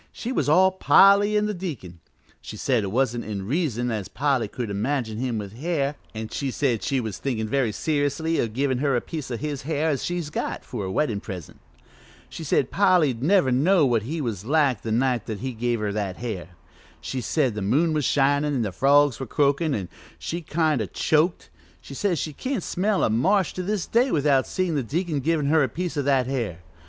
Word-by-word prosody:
She 240 - -5
was 250 - 0
all 185 +5 +5
Polly 200 +2 +5
an' 210 - +2
the 210 - -1
deacon. 140 - -6 0.4
She - - -8
said 125 -5 +1
it 95 - -3
wa'n't 120 0 0
in 100 -3 -5
reason 125 - -1
as 105 -4 -3
Polly 135 -4 0
could 115 0 -5
imagine 110 +1 -2
him 125 -3 -1
with 100 -1 -6
hair, 145 +1 -1 0.2
an' 110 0 -5
she 140 - -3
said 125 -5 0
she 135 +8 0
was 110 -6 -5
thinkin' 115 -5 -2
very 125 -1 +1
seriously 150 +5 0
o' - - 0
givin' 130 +3 -1
her 140 -1 +1
a - - +3
piece 155 -5 -6
o' 120 - -3
his 145 +1 -4
hair 155 +2 -1
as 135 - -2
she's 175 -4 -3
got, - - -4
for 105 -6 -5
a 95 - -4
weddin' 115 -2 0
present. 95 -6 -9 0.7
She 165 - -8
said 140 -3 +1
Polly 180 -8 +4
'd 115 - -10
never 160 -3 +3
know 155 +6 +4
what 120 -4 +2
he 155 +9 -4
was 110 -8 -3
like 135 -3 +2
the 110 - -4
night 125 +1 +1
he 125 +4 -4
give 120 0 -1
her 105 -1 -1
that 100 -3 -3
hair. 105 -8 -5 0.5
She 130 - -4
said 130 +1 0
the 105 - -4
moon 150 - +2
was 150 -1 0
shinin' 145 +2 +2
an' 120 - 0
the 105 - -2
frogs 140 +5 +3
were 135 - -5
croakin', 145 +3 +1
an' 95 -4 -4 0.3
she 170 +1 -4
kind 155 -4 0
o' 105 - -2
choked; 155 - 0 0.3
she - - -11
says 180 +4 0
she 155 +1 -3
can't 255 - -3
smell 200 +2 0
a - - +3
marsh 185 - +2
to 185 - -4
this 200 0 -2
day 245 +4 +2
without 140 - +2
seein' 185 -3 -1
the 145 - 0
deacon 155 +4 -2
givin' 155 +1 0
her 155 +3 +3
that 130 -4 -1
piece 180 0 -3
of 145 -2 -1
hair. 125 - 0
140 Hz, 215 wpm, -24 LUFS, 115-160 Hz, 0.7 s, all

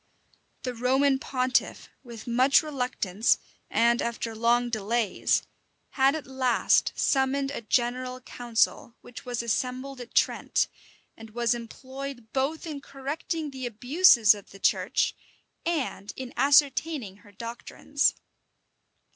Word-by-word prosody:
The 250 - -3
Roman 265 +3 +2
pontiff, 255 -1 -1 0.2
with 235 -3 -10
much 255 +6 +4
reluctance, 250 -8 0 0.3
and 235 +1 +3
after 230 -1 -3
long 240 +2 +2
delays, 220 0 0 0.5
had 270 +1 +3
at 315 - -5
last 260 -2 +2
summoned 275 0 +1
a 280 - -5
general 250 +3 -1
council, 235 -1 -1
which 245 - -11
was 245 -1 -3
assembled 255 +3 -2
at 240 - -11
Trent, - - +2 0.5
and 225 0 -12
was 235 +1 +1
employed 260 +1 -8
both 275 +5 -1
in 300 -4 -6
correcting 285 +3 -4
the 260 -2 -5
abuses 240 - +5
of 205 -2 -12
the 195 - -13
church, - - +1 0.5
and 280 - -2
in 260 -2 -7
ascertaining 275 -4 +2
her 205 0 -19
doctrines. 235 +6 -1
250 Hz, 120 wpm, -27 LUFS, 235-275 Hz, 0.5 s, abuses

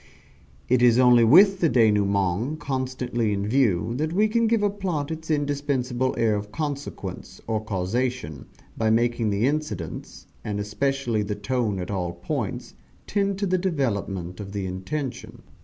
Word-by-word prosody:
It 125 0 +3
is 120 -1 +5
only 125 -2 +6
with 190 - +7
the 165 - +3
denouement 105 - +2
constantly 130 -4 -2
in 100 0 -2
view 115 -5 +2
that 155 +3 -1
we 210 +4 +3
can 230 +1 +2
give 225 -2 +2
a 205 - +3
plot 175 -8 -3
its 160 0 -6
indispensable 140 -4 0
air 110 -2 +2
of 105 0 -5
consequence, 145 0 -5
or 110 -1 -2
causation, 110 - -2 0.3
by 110 -1 +1
making 115 0 +2
the 100 +3 +1
incidents, 145 - -3 0.2
and 105 -1 -3
especially 115 +2 -1
the 105 0 -3
tone 110 -1 -1
at 90 +1 -4
all 90 -3 -2
points, - - -4 0.3
tend 200 -1 0
to 200 - -1
the 185 -1 +1
development 100 - -2
of 100 -1 -7
the 100 -2 -3
intention. 120 +10 -5
125 Hz, 155 wpm, -25 LUFS, 105-145 Hz, 0.3 s, with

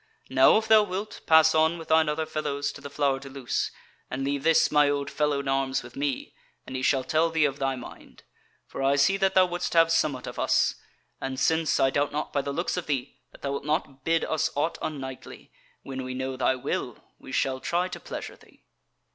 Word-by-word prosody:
Now - - +6
if 220 - -1
thou 220 -1 +7
wilt, 205 +1 -4
pass 160 0 +6
on 160 +2 +3
with 165 - -10
thine 160 -1 +4
other 155 +1 -1
fellows 150 -2 -2
to - - -12
the 140 - -7
Flower 140 -1 0
de 135 0 -10
Luce, 135 -3 -2 0.4
and 130 +1 -3
leave 140 0 -1
this 165 +2 +4
my 150 -1 +4
old 140 0 -2
fellow 150 -2 0
in 140 - -8
arms 135 -1 0
with 120 0 -12
me, 140 -2 -3 0.3
and 130 - -8
he 130 - -2
shall 130 0 +2
tell 160 +4 +1
me 160 -2 +3
of 140 -1 -2
thy 135 -1 0
mind; 125 - -12 0.4
for - - -7
I 135 +1 +3
see 145 +8 +4
that 195 -1 +1
thou 185 -1 +7
wouldest 175 0 -3
have 165 -1 +5
somewhat 150 -6 +1
of - - -7
us; - - +2 0.5
and 135 0 -4
since, 160 +3 +2
I 135 - +3
doubt 145 +1 0
not 150 +1 -4
by 140 - +1
the 140 - -4
looks 175 +5 -2
of 180 - -4
thee, 140 -2 -3
that - - -18
thou 140 - -1
wilt 140 - -3
not 145 -3 -2
bid 165 +2 +1
us 155 - 0
aught 150 +4 -1
unknightly, 130 -4 -7 0.3
when 135 -1 -5
we 130 0 -5
know 130 0 -3
thy 130 0 +1
will, 125 - -3 0.2
we - - -11
shall 130 0 0
try 175 +6 0
to - - -7
pleasure - - -7
thee." - - -23
145 Hz, 225 wpm, -26 LUFS, 135-160 Hz, 0.5 s, thou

